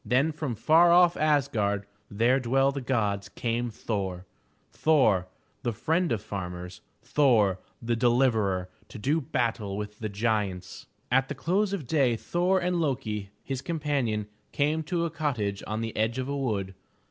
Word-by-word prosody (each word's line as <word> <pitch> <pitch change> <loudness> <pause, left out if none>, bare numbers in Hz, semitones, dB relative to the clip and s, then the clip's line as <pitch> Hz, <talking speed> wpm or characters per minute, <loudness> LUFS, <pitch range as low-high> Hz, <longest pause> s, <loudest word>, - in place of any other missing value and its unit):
Then 130 +8 +2
from 150 -5 -4
far 165 +10 +5
off 175 0 +6
Asgard 125 -10 +1 0.2
where 120 +6 +2
dwell 135 +2 +2
the 140 0 -4
gods, 105 -6 -1
came 120 +2 -2
Thor, 95 -5 -4 0.5
Thor, 110 - +3 0.3
the 120 - -1
friend 165 - 0
of 110 -4 -1
farmers, 90 -2 -6 0.2
Thor, 120 -8 +3 0.2
the 120 0 0
Deliverer, 115 -6 +2 0.2
to - - -9
do 145 +9 +1
battle 115 -6 -2
with 105 0 -6
the 110 - -3
giants. 100 -3 -2 0.2
At 135 +1 +3
the 145 - -3
close 190 +9 0
of 190 -8 -3
day 130 -3 +2
Thor 180 +10 +1
and 180 0 0
Lo'ki, 120 -9 -2 0.2
his 135 -2 -4
companion, 140 -10 -1 0.3
came 150 +2 +1
to 170 +1 0
a 165 - -3
cottage 125 -11 -2
on 110 +2 -2
the 115 -1 -4
edge 110 +3 0
of 130 0 -2
a 140 - -2
wood. 105 -8 -2
120 Hz, 160 wpm, -27 LUFS, 105-145 Hz, 0.5 s, off